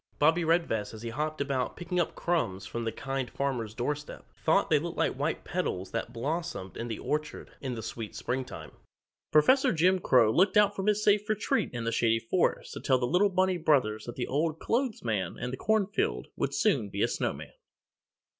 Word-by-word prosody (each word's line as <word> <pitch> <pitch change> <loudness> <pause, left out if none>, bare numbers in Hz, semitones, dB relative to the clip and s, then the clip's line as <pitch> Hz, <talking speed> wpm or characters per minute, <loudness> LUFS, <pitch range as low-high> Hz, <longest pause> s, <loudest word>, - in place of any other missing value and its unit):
Bobbie 165 +3 +4
Redvest 160 -11 0
as 110 - -10
he 115 - -4
hopped 150 +4 -2
about 135 -3 -1
picking 175 +1 -2
up 175 - 0
crumbs 100 - -1
from 115 +3 -4
the 115 - -1
Kind 135 -1 -3
Farmer's 120 -6 -2
doorstep, 145 +5 -4 0.2
thought - - +3
they - - +5
looked - - -5
like - - +2
the - - -10
white - - -1
petals 90 +1 -3
that 115 0 -3
blossomed 140 - -4
in 115 - -4
the 115 - -4
orchard 150 +1 -3
in 130 -3 -3
the 110 - -6
sweet 110 0 -6
springtime. 125 - -4 0.6
Professor 255 - +5
Jim 185 +3 +3
Crow 125 -9 +4
looked 190 - +3
out 205 -1 +5
from 195 +1 -3
his 210 0 +2
safe 210 0 +3
retreat 215 -1 +1
in 120 -2 -4
the 115 - -1
Shady 115 0 +2
Forest 115 +11 0
to - - -6
tell 130 -3 +3
the 125 - 0
little 180 +10 +3
bunny 185 -1 +2
brothers 135 -10 +2
that 120 - -7
the 125 - -2
Old 155 +3 0
Clothes 240 +4 -1
Man 105 -7 -2
in 125 - -4
the - - -3
cornfield 215 +3 0
would - - -1
soon - - +2
be - - -1
a - - +4
snowman! - - -3
140 Hz, 200 wpm, -29 LUFS, 115-175 Hz, 0.6 s, they